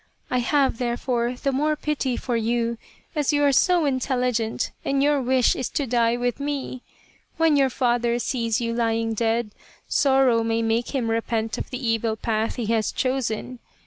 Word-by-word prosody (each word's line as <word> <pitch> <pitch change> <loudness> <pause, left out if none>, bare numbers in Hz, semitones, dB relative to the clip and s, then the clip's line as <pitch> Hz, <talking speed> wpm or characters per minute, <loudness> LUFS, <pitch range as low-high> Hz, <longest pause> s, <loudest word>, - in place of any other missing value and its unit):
I 250 - +2
have, 270 -1 +1
therefore, 240 0 -1
the 275 +2 -1
more 300 +3 +1
pity 290 -4 -2
for 245 - -2
you 230 0 0 0.4
as 295 -1 +1
you 290 -1 +2
are 285 - +5
so 345 +4 +3
intelligent 250 -4 -1
and 275 0 +1
your 290 -1 +3
wish 255 -1 +3
is 255 - -3
to 285 - -1
die 235 -1 +2
with 245 +1 -1
me. 280 -3 -4 0.6
When 325 -2 +4
your 275 -2 +3
father 240 -1 +1
sees 230 -2 -1
you 230 -1 -2
lying 225 -1 0
dead, 225 0 0 0.4
sorrow 265 -4 +3
may 225 0 0
make 225 +4 -1
him 235 -4 0
repent 225 0 -1
of - - -5
the 255 -2 -4
evil 225 -1 0
path 220 0 -1
he 240 - -3
has 220 -1 +1
chosen. 255 -2 -2
245 Hz, 175 wpm, -24 LUFS, 230-270 Hz, 0.6 s, are